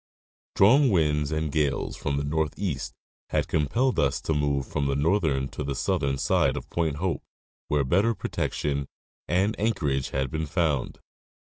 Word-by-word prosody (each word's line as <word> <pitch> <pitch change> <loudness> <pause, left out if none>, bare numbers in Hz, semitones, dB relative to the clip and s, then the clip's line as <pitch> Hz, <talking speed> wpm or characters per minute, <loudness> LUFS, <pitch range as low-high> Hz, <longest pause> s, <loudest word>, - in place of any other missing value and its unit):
Strong 130 +8 +6
winds 75 -6 +2
and 80 -1 -1
gales 75 -2 0
from 70 -1 -2
the 70 - -1
northeast 75 0 -2 0.4
had - - 0
compelled 120 - +1
us 70 -2 +2
to 80 - -1
move 70 -2 0
from 70 +1 -2
the 70 - 0
northern 75 -3 +1
to 75 - -6
the 70 -1 -3
southern 70 -5 0
side - - +2
of - - -6
Point 80 -4 0
Hope, 90 +3 -2 0.5
where 75 -1 +1
better 100 - +2
protection 70 -7 -2 0.4
and 95 +6 +1
anchorage 80 -12 0
had 65 -2 -2
been 80 0 -2
found. 75 -4 -1
75 Hz, 155 wpm, -26 LUFS, 70-90 Hz, 0.5 s, Strong